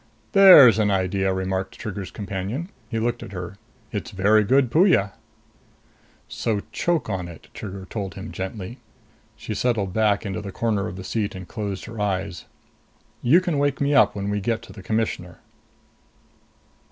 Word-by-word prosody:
"There's 180 Hz, -, +9 dB
an 105 Hz, -1 st, +3 dB
idea," 95 Hz, 0 st, +1 dB
remarked 95 Hz, 0 st, -3 dB
Trigger's 100 Hz, -4 st, -5 dB
companion. 100 Hz, -, -4 dB, 0.2 s
He 115 Hz, -, -3 dB
looked 120 Hz, +2 st, -1 dB
at 100 Hz, -, -9 dB
her. 90 Hz, +1 st, -6 dB, 0.3 s
"It's -, -, -4 dB
very 105 Hz, +3 st, +3 dB
good 130 Hz, +3 st, +3 dB
Puya." 155 Hz, -, +4 dB, 1.2 s
"So 110 Hz, -3 st, -2 dB
choke 170 Hz, -2 st, 0 dB
on 95 Hz, -4 st, -3 dB
it," 85 Hz, -3 st, -13 dB
Trigger 95 Hz, -2 st, -7 dB
told 100 Hz, -5 st, -5 dB
him -, -, -7 dB
gently. 95 Hz, +6 st, -6 dB, 0.6 s
She 110 Hz, -, -6 dB
settled 105 Hz, -4 st, 0 dB
back 105 Hz, -1 st, +2 dB
into 95 Hz, -2 st, -3 dB
the 100 Hz, -1 st, -7 dB
corner 105 Hz, -1 st, -1 dB
of 90 Hz, -, -7 dB
the 95 Hz, -, -7 dB
seat 105 Hz, +1 st, -2 dB
and 95 Hz, -1 st, -8 dB
closed 100 Hz, -4 st, -5 dB
her 115 Hz, -1 st, -8 dB
eyes. 95 Hz, -3 st, -2 dB, 0.8 s
"You 155 Hz, +9 st, +5 dB
can 175 Hz, -6 st, -1 dB
wake 145 Hz, -1 st, +1 dB
me 140 Hz, +1 st, +1 dB
up 140 Hz, -, +5 dB
when 100 Hz, 0 st, -3 dB
we 105 Hz, 0 st, -1 dB
get 115 Hz, +2 st, -1 dB
to 115 Hz, -, -12 dB
the 100 Hz, -, -11 dB
Commissioner." 95 Hz, -4 st, -2 dB
105 Hz, 165 wpm, -23 LUFS, 95-115 Hz, 1.2 s, There's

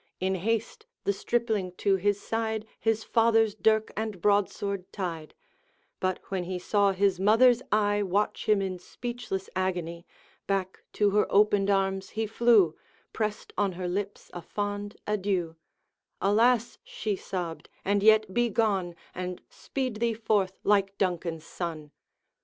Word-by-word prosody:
In 190 Hz, +1 st, 0 dB
haste 220 Hz, +5 st, -2 dB, 0.2 s
the 200 Hz, -, +1 dB
stripling 215 Hz, -4 st, -1 dB
to 195 Hz, +1 st, +2 dB
his 205 Hz, +2 st, +1 dB
side 220 Hz, 0 st, -2 dB
His 225 Hz, -1 st, +1 dB
father's 225 Hz, -2 st, +3 dB
dirk 220 Hz, 0 st, +2 dB
and 215 Hz, -3 st, -3 dB
broadsword 200 Hz, -1 st, 0 dB
tied; 165 Hz, -6 st, -5 dB, 0.6 s
But 185 Hz, 0 st, 0 dB
when 185 Hz, -2 st, -2 dB
he 185 Hz, +1 st, -3 dB
saw 200 Hz, +2 st, +2 dB
his 190 Hz, -1 st, +1 dB
mother's 230 Hz, +5 st, +5 dB
eye 205 Hz, -1 st, +2 dB
Watch 205 Hz, +3 st, -1 dB
him 205 Hz, -2 st, +4 dB
in 185 Hz, -2 st, -3 dB
speechless 220 Hz, -1 st, -5 dB
agony, 175 Hz, -2 st, -2 dB, 0.4 s
Back 190 Hz, -1 st, -2 dB
to 205 Hz, -1 st, +2 dB
her 210 Hz, +1 st, +3 dB
opened 205 Hz, -1 st, +4 dB
arms 195 Hz, -1 st, +1 dB
he 220 Hz, -, +1 dB
flew 220 Hz, -6 st, +4 dB, 0.4 s
Pressed 215 Hz, -1 st, -3 dB
on 200 Hz, -2 st, +1 dB
her 180 Hz, +1 st, -4 dB
lips 200 Hz, +3 st, -4 dB
a 175 Hz, -, -6 dB
fond 205 Hz, +2 st, -4 dB
adieu, 190 Hz, -5 st, -1 dB, 0.6 s
'Alas' 230 Hz, +4 st, +3 dB
she 210 Hz, -2 st, -3 dB
sobbed, 175 Hz, -4 st, -5 dB, 0.2 s
'and 200 Hz, +1 st, +2 dB
yet 215 Hz, -2 st, +5 dB
be 240 Hz, +2 st, +2 dB
gone, 195 Hz, -6 st, 0 dB, 0.2 s
And 180 Hz, 0 st, -4 dB
speed 255 Hz, -5 st, -4 dB
thee 230 Hz, 0 st, 0 dB
forth, 205 Hz, -4 st, 0 dB
like 200 Hz, -1 st, +2 dB
Duncan's 170 Hz, -3 st, -1 dB
son!' 160 Hz, -4 st, -5 dB
200 Hz, 140 wpm, -28 LUFS, 185-220 Hz, 0.6 s, mother's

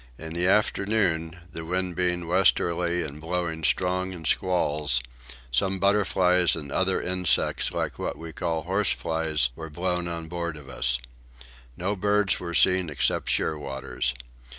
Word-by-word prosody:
In 80 Hz, 0 st, -7 dB
the 90 Hz, +2 st, 0 dB
afternoon, 95 Hz, -5 st, +1 dB
the 80 Hz, -, -5 dB
wind 90 Hz, +1 st, -2 dB
being 90 Hz, -1 st, 0 dB
westerly 85 Hz, -1 st, +2 dB
and 75 Hz, 0 st, -8 dB
blowing 80 Hz, -1 st, -2 dB
strong 95 Hz, +3 st, +1 dB
in 85 Hz, -3 st, -9 dB
squalls, 75 Hz, -8 st, +1 dB, 0.5 s
some 95 Hz, +10 st, +1 dB
butterflies 90 Hz, -3 st, +3 dB
and 75 Hz, -4 st, -7 dB
other 95 Hz, +4 st, +1 dB
insects 90 Hz, -1 st, +1 dB
like -, -, -3 dB
what -, -, -3 dB
we 80 Hz, -1 st, -8 dB
call 80 Hz, -3 st, -2 dB
horseflies 80 Hz, -7 st, +1 dB
were 80 Hz, +3 st, -7 dB
blown 90 Hz, +2 st, -1 dB
on 85 Hz, -1 st, -4 dB
board 85 Hz, -1 st, -4 dB
of 70 Hz, -2 st, -12 dB
us. 65 Hz, -2 st, +1 dB, 0.8 s
No 95 Hz, +4 st, -1 dB
birds 100 Hz, 0 st, +2 dB
were 85 Hz, -1 st, -4 dB
seen 95 Hz, -2 st, +4 dB
except 75 Hz, -, 0 dB
shearwaters. 65 Hz, -4 st, -1 dB
85 Hz, 140 wpm, -26 LUFS, 80-95 Hz, 0.8 s, seen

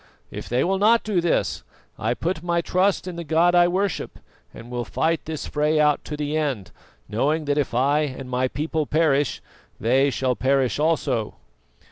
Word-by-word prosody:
If -, -, -7 dB
they 125 Hz, +2 st, +1 dB
will 190 Hz, +2 st, 0 dB
not 225 Hz, +3 st, +4 dB
do 200 Hz, -5 st, 0 dB
this, 170 Hz, -, 0 dB, 0.4 s
I 115 Hz, +3 st, 0 dB
put 165 Hz, +2 st, -2 dB
my 170 Hz, 0 st, 0 dB
trust 185 Hz, +2 st, +1 dB
in 175 Hz, -2 st, -6 dB
the 170 Hz, -, -4 dB
God 165 Hz, +3 st, +3 dB
I 175 Hz, 0 st, +6 dB
worship 190 Hz, +2 st, -2 dB, 0.3 s
and 120 Hz, +1 st, -12 dB
will 120 Hz, -1 st, -2 dB
fight 160 Hz, +6 st, -1 dB
this 155 Hz, -1 st, -5 dB
fray 150 Hz, +1 st, +1 dB
out 150 Hz, -1 st, +3 dB
to 150 Hz, -, -5 dB
the 150 Hz, 0 st, -2 dB
end, 140 Hz, -11 st, -2 dB, 0.4 s
knowing 145 Hz, +9 st, 0 dB
that 145 Hz, +1 st, +1 dB
if 135 Hz, -4 st, -2 dB
I 140 Hz, +4 st, +3 dB
and 135 Hz, -3 st, -3 dB
my 125 Hz, 0 st, 0 dB
people 155 Hz, +2 st, -2 dB
perish, 150 Hz, -3 st, +1 dB, 0.4 s
they 130 Hz, +5 st, +3 dB
shall 130 Hz, -1 st, 0 dB
perish 135 Hz, 0 st, +1 dB
also." 150 Hz, -8 st, 0 dB
150 Hz, 180 wpm, -23 LUFS, 130-170 Hz, 0.4 s, I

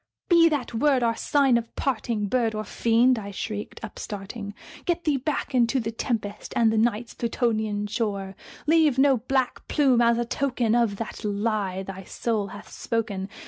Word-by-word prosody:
"Be 335 Hz, -2 st, +6 dB
that 280 Hz, -6 st, -2 dB
word 260 Hz, +2 st, +3 dB
our 230 Hz, -1 st, +2 dB
sign 270 Hz, -3 st, +3 dB
of 230 Hz, 0 st, -10 dB
parting, 230 Hz, -5 st, -1 dB
bird 230 Hz, -1 st, +1 dB
or 215 Hz, -, -2 dB
fiend!" 235 Hz, +4 st, +3 dB
I 200 Hz, -1 st, -7 dB
shrieked, 205 Hz, +1 st, -5 dB
upstarting 205 Hz, -1 st, -6 dB, 0.3 s
"Get 345 Hz, -1 st, 0 dB
thee 295 Hz, -3 st, +2 dB
back 285 Hz, +1 st, -3 dB
into 245 Hz, +1 st, +3 dB
the 225 Hz, -1 st, -3 dB
tempest 220 Hz, -3 st, -3 dB
and 225 Hz, -2 st, +4 dB
the -, -, +1 dB
Night's 230 Hz, 0 st, 0 dB
Plutonian 220 Hz, -3 st, -1 dB
shore! 200 Hz, -3 st, -2 dB, 0.3 s
Leave 310 Hz, -3 st, +4 dB
no 270 Hz, -1 st, +5 dB
black 255 Hz, +2 st, -1 dB
plume 265 Hz, -5 st, +3 dB
as 235 Hz, 0 st, +4 dB
a 240 Hz, -, 0 dB
token 245 Hz, -3 st, 0 dB
of 235 Hz, -4 st, +2 dB
that 225 Hz, +2 st, -6 dB
lie 205 Hz, -2 st, -1 dB
thy 190 Hz, 0 st, -7 dB
soul 215 Hz, +1 st, -2 dB
hath 205 Hz, +2 st, -11 dB
spoken! 210 Hz, -4 st, -3 dB
230 Hz, 170 wpm, -25 LUFS, 210-255 Hz, 0.3 s, Be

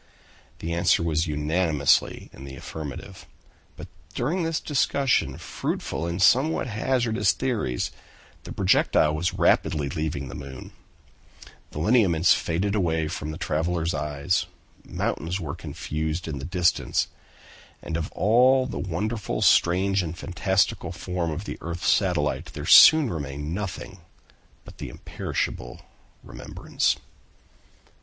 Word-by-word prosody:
The 85 Hz, +1 st, -4 dB
answer 85 Hz, 0 st, +3 dB
was 80 Hz, 0 st, 0 dB
unanimously 75 Hz, 0 st, +1 dB
in 65 Hz, -, -11 dB
the 70 Hz, -1 st, -8 dB
affirmative. 75 Hz, 0 st, -8 dB, 0.5 s
But -, -, -8 dB, 0.3 s
during 155 Hz, +10 st, -1 dB
this 165 Hz, -1 st, -1 dB
discussion, 140 Hz, -2 st, +1 dB
fruitful 85 Hz, -, -4 dB
in 85 Hz, +2 st, -3 dB
somewhat 135 Hz, +10 st, +4 dB
hazardous 115 Hz, -3 st, +1 dB
theories, 110 Hz, -, -2 dB, 0.5 s
the -, -, -9 dB
projectile 90 Hz, -5 st, +3 dB
was 80 Hz, +3 st, -1 dB
rapidly 75 Hz, -2 st, +2 dB
leaving 75 Hz, -1 st, -3 dB
the -, -, -8 dB
moon: 65 Hz, -1 st, -9 dB, 1.0 s
the -, -, -10 dB
lineaments 90 Hz, -2 st, +4 dB
faded 95 Hz, +5 st, -1 dB
away 80 Hz, -6 st, 0 dB
from 75 Hz, 0 st, -5 dB
the 80 Hz, -, -5 dB
travelers' 85 Hz, +2 st, -1 dB
eyes, 75 Hz, +2 st, -1 dB, 0.4 s
mountains 85 Hz, +5 st, -3 dB
were 75 Hz, -5 st, -4 dB
confused 80 Hz, +2 st, -4 dB
in 75 Hz, -4 st, -4 dB
the 70 Hz, -, -6 dB
distance; 90 Hz, 0 st, +1 dB, 0.8 s
and 80 Hz, -, -4 dB
of 80 Hz, -1 st, -3 dB
all 125 Hz, +5 st, +4 dB
the 130 Hz, -, -5 dB
wonderful, 95 Hz, -, -3 dB
strange, 95 Hz, +3 st, +4 dB
and 85 Hz, -1 st, -5 dB
fantastical 95 Hz, +1 st, 0 dB
form 90 Hz, -2 st, -3 dB
of 85 Hz, +6 st, -4 dB
the -, -, -6 dB
earth's 85 Hz, +1 st, -4 dB
satellite, 90 Hz, -7 st, +1 dB
there -, -, -6 dB
soon 155 Hz, -6 st, +8 dB
remained 75 Hz, 0 st, -5 dB
nothing 95 Hz, -1 st, -5 dB, 0.7 s
but -, -, -14 dB
the -, -, -5 dB
imperishable -, -, -4 dB, 0.4 s
remembrance. -, -, -2 dB
85 Hz, 125 wpm, -25 LUFS, 75-100 Hz, 1.0 s, soon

